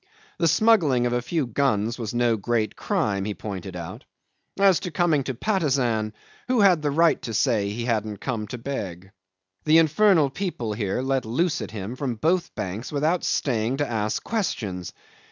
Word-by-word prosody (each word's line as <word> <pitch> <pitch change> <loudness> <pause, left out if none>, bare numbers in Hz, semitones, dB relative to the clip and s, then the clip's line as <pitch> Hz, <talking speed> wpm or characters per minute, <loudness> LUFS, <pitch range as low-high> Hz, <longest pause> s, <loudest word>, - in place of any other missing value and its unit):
The 165 - +3
smuggling 160 - +4
of 120 - 0
a 120 - +1
few 155 +4 -1
guns 115 -2 0
was 110 -3 -3
no 120 -1 +2
great 110 0 -1
crime, 100 -2 -1
he 105 0 -3
pointed 95 -3 -6
out. 85 -2 -7 0.5
As 195 -3 +5
to - - -5
coming 160 -3 +1
to 130 - -3
Patusan, 130 - 0 0.3
who 250 -3 +2
had 185 -5 +5
the 150 - 0
right 165 +3 +3
to 115 -3 -5
say 110 -6 +2
he 115 +3 -4
hadn't 110 -3 -1
come 110 -2 -3
to 125 - -6
beg? 95 -8 -6 0.5
The 155 +1 +6
infernal 165 -2 +4
people 135 - -3
here 105 +3 -2
let 135 -1 0
loose 145 +10 0
at - - -5
him 105 +2 -6
from 130 -3 -3
both 170 +10 0
banks 100 +6 -5
without 155 +4 +1
staying 120 -1 0
to 145 0 0
ask 110 -2 -2
questions. 105 - -3
125 Hz, 175 wpm, -24 LUFS, 110-155 Hz, 0.5 s, The